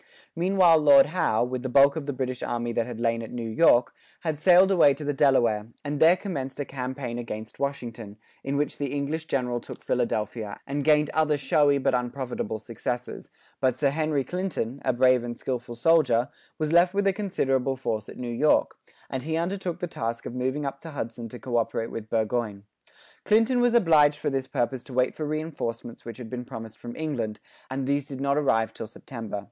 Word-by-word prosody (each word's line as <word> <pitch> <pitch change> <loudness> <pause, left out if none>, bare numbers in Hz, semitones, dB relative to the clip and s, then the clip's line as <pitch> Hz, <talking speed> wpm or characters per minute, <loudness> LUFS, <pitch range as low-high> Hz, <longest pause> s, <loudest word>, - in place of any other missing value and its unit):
Meanwhile 175 -1 +4
Lord 140 -2 +7
Howe, 150 -9 +1
with 125 0 -3
the 130 - -3
bulk 140 +2 +6
of 155 -3 -5
the - - 0
British 130 -2 -3
army 120 0 -2
that 115 +1 0
had 120 -2 -7
lain 115 0 0
at 115 - -7
New 120 -2 -5
York, 120 0 +4 0.3
had 155 -3 -2
sailed 185 +3 +6
away 150 -7 +5
to 155 - -8
the 145 0 -1
Delaware, 120 -7 +3 0.2
and 145 0 -2
there 165 +3 +7
commenced 145 -10 -5
a 145 - -1
campaign 130 -2 -5
against 110 -2 -7
Washington, 115 -7 -4 0.3
in 140 +1 -1
which 145 0 -1
the 145 - -1
English 145 +3 -2
general 125 -5 -1
took - - -11
Philadelphia, 110 -3 -2
and 140 +1 -2
gained 150 0 +3
other 155 -1 +2
showy, 145 +1 +3
but 135 - +1
unprofitable 125 -3 -2
successes, 120 +2 -5 0.3
But 130 -2 +2
Sir 140 +1 +1
Henry 155 -2 0
Clinton, 140 -6 -3
a 130 - +2
brave 130 0 +4
and 120 -1 -5
skilful 125 -2 -4
officer, 130 -3 +3 0.3
was 155 0 -1
left 175 +2 +5
with 200 0 +1
a 195 - +3
considerable 135 -10 0
force 110 -5 -3
at - - -10
New 120 -1 -4
York; 150 +6 +2 0.3
and 130 - -4
he 160 +4 -2
undertook 180 +1 -2
the - - -3
task 115 -8 -4
of - - -5
moving 130 +4 -2
up 140 0 -5
the 165 - -8
Hudson 115 -5 -5
to 125 - -9
co 120 -1 -2
operate 115 0 -1
with 110 -1 -6
Burgoyne. 110 -2 -1 0.6
Clinton 225 +4 +3
was 245 -1 +3
obliged 155 -8 +5
for 145 - -2
this 135 -1 -2
purpose 120 +1 -1
to 135 - -10
wait 130 0 +2
for 155 - -4
reinforcements 145 -7 -4
which 115 -2 -8
had 125 - -8
been 125 -1 -4
promised 115 -2 -9
from 120 0 -8
England, 125 -9 -3 0.3
and 135 0 -3
these 140 +1 0
did 135 -2 -7
not 140 0 +1
arrive 115 -7 +1
till 115 - -7
September. 115 -2 -7
135 Hz, 200 wpm, -26 LUFS, 120-150 Hz, 0.6 s, Lord